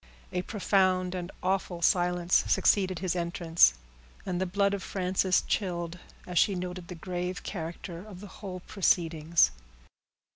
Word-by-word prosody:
A 180 - 0
profound 185 -3 +1
and 180 0 -5
awful 185 -2 -1
silence 175 0 +3
succeeded 190 -3 +3
his 180 0 -2
entrance, 170 - +3 0.5
and 180 0 -2
the 190 - 0
blood 200 +2 +1
of 200 - -2
Frances 185 0 +1
chilled 175 -3 -2 0.3
as 180 -2 +1
she 200 - +3
noted 180 -1 -5
the 180 - -7
grave 180 +1 -4
character 170 0 -6
of 205 -4 -11
the 205 - -9 0.2
whole 185 -3 -6
proceedings. 165 - +2
180 Hz, 140 wpm, -29 LUFS, 175-190 Hz, 0.5 s, silence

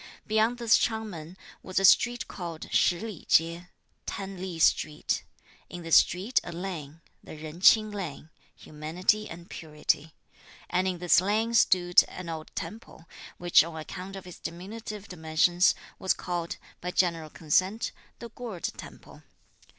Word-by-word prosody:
Beyond 220 +3 +2
this 235 -2 +4
Ch'ang 220 -1 -1
Men 165 +1 -9 0.2
was 185 - -7
a 195 - +4
street 240 +4 +4
called 170 -4 -7
Shih 175 - +3
li 215 -6 -7
chieh 170 +2 +3 0.4
(Ten 195 -2 -5
Li 185 -3 -5
street); 155 -1 +1 0.5
in 175 -1 -8
this 165 -1 +6
street 195 +8 +3
a - - -7
lane, 165 -4 -6 0.2
the - - -10
Jen 155 +2 -9
Ch'ing 215 +2 +6
lane 160 -5 -6 0.2
(Humanity 175 +8 -1
and 170 +1 -10
Purity); 155 0 -2 0.6
and 185 +1 +1
in 185 -1 -1
this 175 -1 +4
lane 215 +4 0
stood 175 -5 +5
an 180 -2 -8
old 160 -1 -6
temple, 170 -2 -7 0.3
which 175 -2 +5
on 165 0 -7
account 185 +4 -7
of 195 - -9
its 180 - -11
diminutive 205 +4 -7
dimensions, 175 +1 +2 0.2
was 190 - +2
called, 175 -1 -4 0.2
by 180 - -3
general 170 -4 0
consent, 185 +8 0 0.3
the 235 - -9
Gourd 230 -6 -8
temple. - - -12
180 Hz, 150 wpm, -28 LUFS, 165-200 Hz, 0.6 s, this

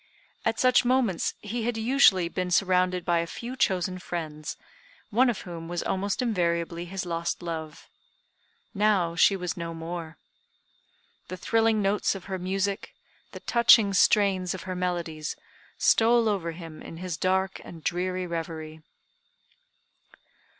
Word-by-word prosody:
At 225 - 0
such 255 -1 +5
moments 245 -8 +1
he 225 +3 -3
had 240 -1 -1
usually 220 -7 +4
been 180 +1 -3
surrounded 180 -1 +2
by 175 -2 +2
a 170 - -2
few 240 +8 -6
chosen 185 -5 0
friends, 155 -4 -5 0.5
one 245 +4 +4
of 235 - -2
whom 165 -2 -8
was 175 0 -3
almost 200 +5 -1
invariably 170 -5 -1
his 185 +1 -5
lost 170 0 -3
love. 160 -3 -6 0.9
Now 195 -5 +2
she 195 +4 +5
was 180 -3 -3
no 170 -1 -5
more. 165 -1 -6 1.1
The 185 - -6
thrilling 225 +2 +2
notes 200 +1 +1
of 190 - -7
her 190 -1 -4
music, 195 +2 -2 0.4
the - - -9
touching 230 -4 +5
strains 190 -1 +3
of 185 - -8
her 185 -1 -4
melodies, 170 -4 -3 0.4
stole 230 0 +4
over 180 -6 -1
him 165 -2 -10
in 165 - -9
his 180 -1 -4
dark 190 +3 0
and 165 -2 -11
dreary 185 +2 -1
reverie. 160 -2 -5
185 Hz, 140 wpm, -27 LUFS, 170-200 Hz, 1.1 s, such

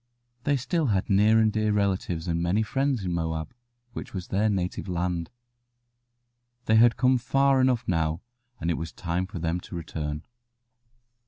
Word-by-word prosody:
They 145 -1 +3
still 140 +5 0
had 100 -3 0
near 105 +3 +5
and 110 -1 +3
dear 110 -1 +1
relatives 95 -4 -1
and 85 0 0
many 90 +6 +1
friends 135 -1 -1
in 90 - -1
Moab, 80 +3 -3 0.4
which - - -7
was 90 -2 -5
their 105 +3 +2
native 95 -1 -2
land. 90 -2 -2 1.4
They 110 -1 +4
had 120 +1 +5
come 130 +2 +3
far 135 +1 +3
enough 130 -2 +1
now, 80 -1 0 0.4
and 85 +1 -1
it - - -1
was 80 0 -5
time 90 +1 -2
for 95 - -8
them 85 +1 -1
to 90 - -10
return. 75 -3 -4
95 Hz, 165 wpm, -26 LUFS, 85-110 Hz, 1.4 s, near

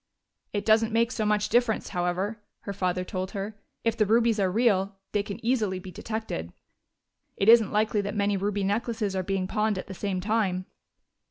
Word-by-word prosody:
"It 205 - -2
doesn't 225 +1 +4
make 230 +1 +2
so 215 -4 -1
much 210 0 +2
difference, 240 -2 +2
however," 185 +4 -1 0.2
her 200 - -5
father 185 -2 -1
told 185 0 -4
her. 200 +3 -3 0.3
"If 230 -1 +1
the 215 -3 +2
rubies 225 0 +3
are 190 -2 +2
real, 200 -3 +2 0.2
they 205 - +1
can 200 -1 -6
easily 220 -6 +1
be 185 0 -8
detected. 215 - -5 0.8
It 195 - 0
isn't 225 -2 +7
likely 210 0 +2
that 200 +1 -4
many 205 0 +1
ruby 200 +1 -1
necklaces 210 0 -1
are 190 - +1
being 190 0 -1
pawned 210 +1 0
at 185 - -4
the 190 - -8
same 190 0 -2
time." 190 -2 0
205 Hz, 185 wpm, -27 LUFS, 190-220 Hz, 0.8 s, isn't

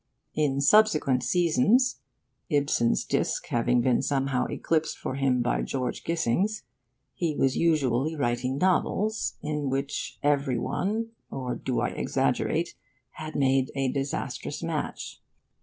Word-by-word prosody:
In 140 -3 +1
subsequent 155 -7 +4
seasons 180 - +3 0.5
(Ibsen's 140 -6 +2
disc - - -1
having 120 +1 +2
been 125 0 +2
somehow 135 -2 0
eclipsed 160 -1 -1
for - - -4
him 130 -2 +1
by 125 - 0
George 125 -2 -3
Gissing's) 170 - 0 0.5
he 155 +4 -1
was 135 -2 +2
usually 155 -2 +1
writing 130 -1 -1
novels 200 +5 +1
in 150 -2 -2
which 135 +2 -3
every 140 -3 +2
one 220 - -1 0.2
or 130 -2 -3
do 125 0 -2
I - - +1
exaggerate? - - 0 0.4
had 155 0 -8
made 135 -1 +2
a 135 -2 0
disastrous 135 0 -3
match. - - -4
140 Hz, 125 wpm, -27 LUFS, 130-160 Hz, 0.5 s, subsequent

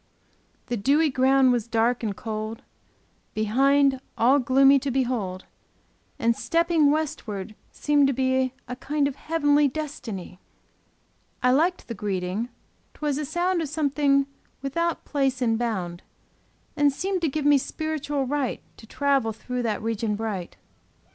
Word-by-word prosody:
The 240 - -2
dewy 290 +8 +3
ground 260 0 +4
was 240 -2 0
dark 235 +1 +1
and 210 -4 -2
cold; 220 0 -5 0.7
Behind, 270 +5 +3 0.2
all 260 +5 +4
gloomy 270 +2 +5
to 280 +1 -3
behold: 235 -8 -2 0.7
And 230 0 +2
stepping 335 -1 +2
westward 225 -10 -2 0.2
seemed 290 -1 +2
to 275 - +1
be 260 0 +1 0.2
A 250 - -5
kind 285 +2 0
of 280 - -5
heavenly 295 -2 +2
destiny: 250 - -6 1.0
I 250 - +5
liked 335 +7 +1
the 235 - -4
greeting; 195 +2 -3 0.5
'twas 295 -2 -2
a 300 - -2
sound 345 +4 0
Of 310 - -3
something 285 -2 +2 0.4
without 335 +5 -1
place 270 -3 0
and 225 -3 +1
bound, 185 -8 -3 0.7
And 290 -1 +4
seemed 370 +6 -2
to 325 - +1
give 295 +1 -3
me 290 -1 +6
spiritual 295 -1 -3
right 275 -1 -1 0.2
To 225 - -14
travel 275 -3 +1
through 250 +3 -4
that 215 -3 -2
region 225 -1 -1
bright. 205 -5 -4
265 Hz, 140 wpm, -25 LUFS, 225-290 Hz, 1.0 s, me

